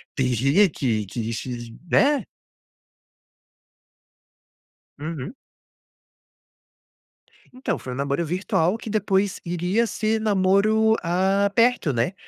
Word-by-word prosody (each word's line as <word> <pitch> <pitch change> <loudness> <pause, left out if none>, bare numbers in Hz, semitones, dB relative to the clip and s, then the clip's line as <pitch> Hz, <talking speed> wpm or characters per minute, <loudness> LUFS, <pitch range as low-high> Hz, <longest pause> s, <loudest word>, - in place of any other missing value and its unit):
tem 130 - +1
dia 140 - +3
que 110 -8 -1
que 115 +2 -4
que, 120 0 -6 0.2
né. 285 +1 +3 2.7
Uhum. 160 - -6 2.2
Então, 255 - -3
foi 125 - -7
um - - -6
namoro 140 +4 -1
virtual 180 +2 0
que 225 - -8
depois 200 -2 0
iria 180 +7 0
ser 220 +1 -1
namoro, 215 +2 +3
ah, 190 +4 +1
perto, 230 - +2
né. 120 +10 0
185 Hz, 100 wpm, -23 LUFS, 140-215 Hz, 2.7 s, dia